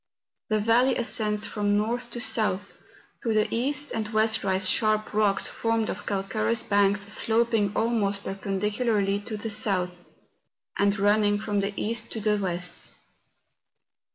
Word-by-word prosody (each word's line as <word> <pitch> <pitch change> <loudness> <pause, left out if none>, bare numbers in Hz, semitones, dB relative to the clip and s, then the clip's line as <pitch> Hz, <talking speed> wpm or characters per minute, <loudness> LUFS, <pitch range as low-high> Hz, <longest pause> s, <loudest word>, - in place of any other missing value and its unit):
The 215 - +2
valley 235 +5 +3
ascends 215 -3 +1
from 205 -1 0
north 240 +3 -2
to 240 - -5
south. 215 -4 -1 0.4
To 225 -3 -1
the 215 0 +3
east 285 +5 -1
and 215 -1 -3
west 220 0 +2
rise 190 -1 +2
sharp 215 +2 +1
rocks 210 -2 +2
formed 225 -1 -1
of - - -8
calcareous 215 +3 0
banks 200 0 +2
sloping 220 0 +2
almost 210 -3 0
perpendicularly 200 +1 -1
to 215 +1 -6
the 220 +1 -4
south, 180 -4 0 0.7
and 200 0 +1
running 205 +1 +3
from 210 -1 -2
the 200 +1 -1
east 230 +2 -1
to 225 - -4
the 210 0 +1
west. 180 -2 -3
210 Hz, 140 wpm, -26 LUFS, 200-225 Hz, 0.7 s, valley